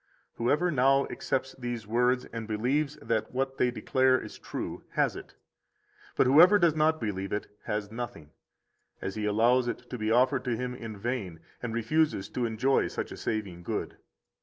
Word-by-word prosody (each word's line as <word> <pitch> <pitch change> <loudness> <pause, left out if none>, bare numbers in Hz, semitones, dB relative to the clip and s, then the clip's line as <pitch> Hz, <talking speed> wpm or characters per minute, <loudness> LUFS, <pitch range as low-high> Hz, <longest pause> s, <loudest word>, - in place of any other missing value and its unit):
35 - - -41
Whoever 150 +9 +2
now 135 0 +4
accepts 135 0 -2
these 120 -3 -4
words, 125 +3 +2
and 115 -2 -5
believes 130 +7 0
that 110 -2 -1
what 135 +1 -2
they 125 - +4
declare 130 +1 +2
is - - -9
true, - - -5
has - - +1
it. - - -10 0.8
But - - +4
whoever 170 +10 +7
does 170 -5 +3
not 155 +1 +3
believe 95 -3 -3
it 105 0 -4
has 105 0 -3
nothing, 115 -10 -6 0.7
as 95 - -4
he 105 0 -3
allows 120 +4 +3
it 120 - -4
to 125 - -4
be 110 0 -1
offered 130 +3 +3
to 120 -2 0
him 125 +1 -3
in 115 -4 -7
vain, 100 -7 -3 0.2
and 120 - -3
refuses 115 -2 +1
to 125 -2 -1
enjoy 125 +5 +2
such - - -4
a - - -6
saving 100 -5 -3
good. - - -4
120 Hz, 180 wpm, -29 LUFS, 110-130 Hz, 0.8 s, whoever